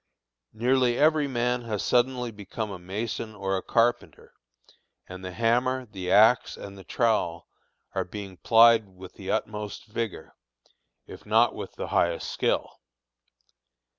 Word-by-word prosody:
Nearly 125 +1 +2
every 155 -1 +3
man 125 -1 0
has 105 -3 -3
suddenly 125 -1 +1
become 105 +1 -6
a 95 - -7
mason 105 +4 -5
or 95 -1 -2
a 95 - -2
carpenter, 120 +4 0 0.7
and 95 0 -9
the 95 - -5
hammer, 125 +5 +1
the 95 -5 -6
axe, 110 +6 +4
and 100 -1 -9
the 95 - -12
trowel 95 -6 0 0.5
are - - 0
being 95 0 -8
plied 115 -1 +5
with 95 0 -13
the - - -9
utmost 105 -1 -3
vigor, 115 -1 -5 0.7
if - - -12
not - - +3
with - - -8
the - - -5
highest 85 -1 0
skill. - - -1
110 Hz, 135 wpm, -26 LUFS, 95-120 Hz, 0.7 s, plied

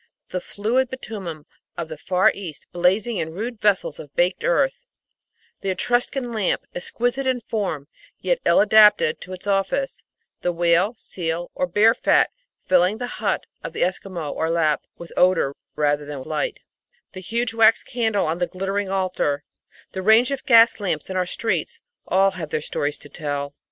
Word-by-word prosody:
The 180 - -3
fluid 235 +7 0
bitumen 195 - -7 0.3
of 170 - -3
the 155 - -7
Far 180 +4 +3
East, 175 -7 -8
blazing 195 +6 +1
in 160 -1 -3
rude 225 +2 -5
vessels 345 - +1
of - - -11
baked - - +1
earth; - - +1 0.7
the 195 - -3
Etruscan 245 +5 0
lamp, 215 -5 0
exquisite 245 +8 -2
in 255 -1 +1
form, 195 -11 -3 0.3
yet - - 0
ill - - +4
adapted 210 -6 +5
to 185 - -8
its 185 +1 -8
office; 200 +7 -1 0.4
the 175 - +1
whale, 175 +5 +2
seal, 170 -3 -4
or 180 - -1
bear 210 +6 +5
fat, - - +3 0.3
filling 185 +3 +3
the 245 - -3 0.2
hut - - 0 0.2
of - - -6
the - - 0
Esquimau 175 - -3
or 160 - -1
Lapp 155 -3 +2 0.2
with 170 - -10
odour 180 -6 +3 0.2
rather 145 -1 +1
than 145 -2 -6
light; 420 - -3 0.5
the 185 - -8
huge 230 +5 -1
wax 225 0 +5
candle 225 -4 0
on 160 +2 -1
the 175 - +1
glittering 195 +1 -2
altar; 185 -7 -1 0.5
the 190 - -4
range 220 +6 +5
of 275 -1 -4
gas 230 -2 +6
lamps 185 -4 -2
in - - -4
our 180 -1 0
streets 190 -5 -2 0.3
all 195 +1 +4
have 170 -5 -6
their - - -1
stories 145 -1 -2
to - - -13
tell. 145 -2 -4
190 Hz, 170 wpm, -23 LUFS, 170-230 Hz, 0.7 s, gas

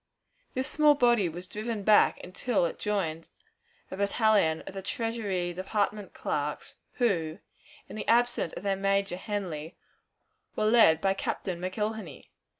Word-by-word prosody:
This 260 +1 -1
small 300 -1 +4
body 240 -8 +3
was 175 +3 -7
driven 215 +1 -4
back 210 +1 +5
until 185 +2 0
it 170 - -4
joined 165 -6 -2 0.6
a 190 - -5
battalion 200 -5 +2
of - - -9
the 195 - -5
Treasury 200 -6 -2
Department 200 +2 -2
clerks, 145 0 -3 0.2
who, 170 -10 0 0.5
in - - -9
the 215 - -5
absence 240 -7 +2
of - - -7
their 200 -1 +1
major, 195 -1 0
Henly, 180 -5 -5 0.8
were 215 - 0
led 215 -8 +5
by 195 0 +2
Captain 185 -2 -3
McIlhenney. 210 -2 -4
195 Hz, 140 wpm, -28 LUFS, 175-220 Hz, 0.8 s, back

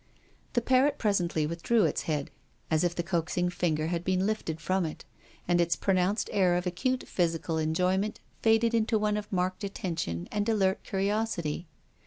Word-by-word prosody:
The 240 - +1
parrot 265 +3 +3
presently 175 -7 +1
withdrew 170 +8 +1
its - - 0
head, 150 -3 -1 0.4
as 155 +1 +3
if 175 -1 0
the 170 - -1
coaxing 175 0 0
finger 155 -3 0
had 170 +1 -2
been 185 +1 +1
lifted 200 -7 -2
from 185 +2 0
it, 155 -2 -5 0.4
and 175 0 +3
its 170 0 +2
pronounced 195 +2 +1
air 185 -3 +3
of 180 - -2
acute 255 +9 -1
physical 165 -2 0
enjoyment 180 +6 0 0.2
faded 225 +1 +3
into 225 0 +2
one 210 0 +1
of 210 0 -5
marked 185 +1 -1
attention 165 - -3
and 210 +1 0
alert 195 -4 +2
curiosity. 195 -5 -1
185 Hz, 165 wpm, -29 LUFS, 170-210 Hz, 0.4 s, parrot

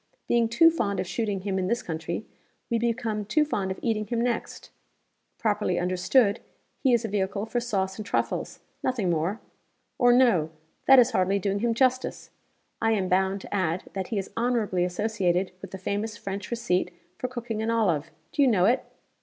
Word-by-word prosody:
Being 235 -1 +2
too 330 +8 +6
fond 200 - -1
of 185 - -1
shooting 200 +1 -2
him 190 0 -1
in 185 - -1
this 235 +4 0
country, 165 +5 -4 0.5
we 230 - +2
become 230 -2 -1
too 300 +9 +2
fond 200 -10 -2
of 190 - -3
eating 215 -2 0
him 235 +2 -1
next. 240 0 -2 0.7
Properly 205 -5 0
understood, 190 +5 +2 0.4
he 265 - +2
is 235 -1 +3
a - - 0
vehicle 200 0 -1
for 240 +2 -1
sauce 195 -5 -2
and - - -3
truffles 205 - -2 0.2
nothing 220 -9 0
more. 170 +7 -1 0.6
Or 245 -2 +6
no 235 -11 +4 0.4
that 270 - +9
is 250 0 +6
hardly 190 -1 +2
doing 200 +1 -1
him 230 +1 +1
justice. 255 +1 0 0.5
I 225 0 +3
am 190 -4 0
bound 190 +1 +1
to - - -9
add 185 -3 0
that 190 -2 -3
he 220 - -3
is 195 - -3
honorably 230 -6 +1
associated 185 -1 0
with - - -8
the 190 - -7
famous 205 +3 -3
French 195 -1 -5
receipt 230 -7 0 0.3
for 255 - -1
cooking 240 -3 -4
an 220 - -1
olive. 180 -10 +1 0.2
Do - - 0
you 275 - +6
know 195 -7 +4
it?" 245 +5 +3
210 Hz, 185 wpm, -26 LUFS, 190-235 Hz, 0.7 s, that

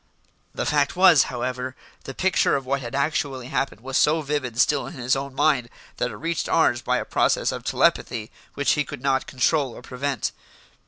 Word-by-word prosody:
The - - -2
fact 145 -2 +1
was, 180 -7 +6
however, 125 +1 -4 0.3
the 135 - -7
picture 190 0 +2
of 135 -2 -3
what 135 +1 -1
had 120 0 -6
actually 140 -3 -1
happened 135 -5 -2
was 135 +2 -2
so 155 +1 +3
vivid 135 -5 -3
still 145 +2 +2
in - - -8
his 125 0 0
own 135 0 -5
mind 140 -4 +2 0.3
that 125 - 0
it - - -8
reached 165 +1 -2
ours 120 -7 +3
by - - 0
a - - -3
process - - +1
of - - -6
telepathy 110 -1 0 0.2
which 140 - +2
he 150 - +2
could 125 - -9
not 135 -1 +1
control 130 -1 +1
or - - -11
prevent. 130 +1 -3
135 Hz, 195 wpm, -24 LUFS, 125-145 Hz, 0.3 s, was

